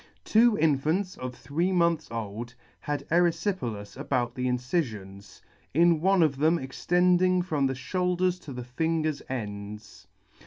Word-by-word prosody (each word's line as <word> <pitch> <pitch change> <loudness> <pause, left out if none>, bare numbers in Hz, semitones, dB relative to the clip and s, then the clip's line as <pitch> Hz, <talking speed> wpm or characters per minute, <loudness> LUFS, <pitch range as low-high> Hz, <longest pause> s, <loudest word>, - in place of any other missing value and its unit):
Two 230 0 +4
infants 160 +5 +1
of 125 -1 -6
three 170 +9 -1
months 170 -4 +1
old 115 +1 -5 0.2
had 145 -1 -4
eryfjpelas 165 - 0
about 125 -3 -1
the 125 0 -2
incifions, 110 - -3 0.3
in 170 -1 +4
one 190 0 +4
of 145 -4 +1
them 160 +4 +3
extending 180 +6 +2
from 150 -6 0
the 130 - -2
fhoulders 180 +5 0
to 145 - -9
the 125 -1 -6
fingers' 155 +3 -1
ends. 105 -3 -7
150 Hz, 130 wpm, -27 LUFS, 125-175 Hz, 0.3 s, Two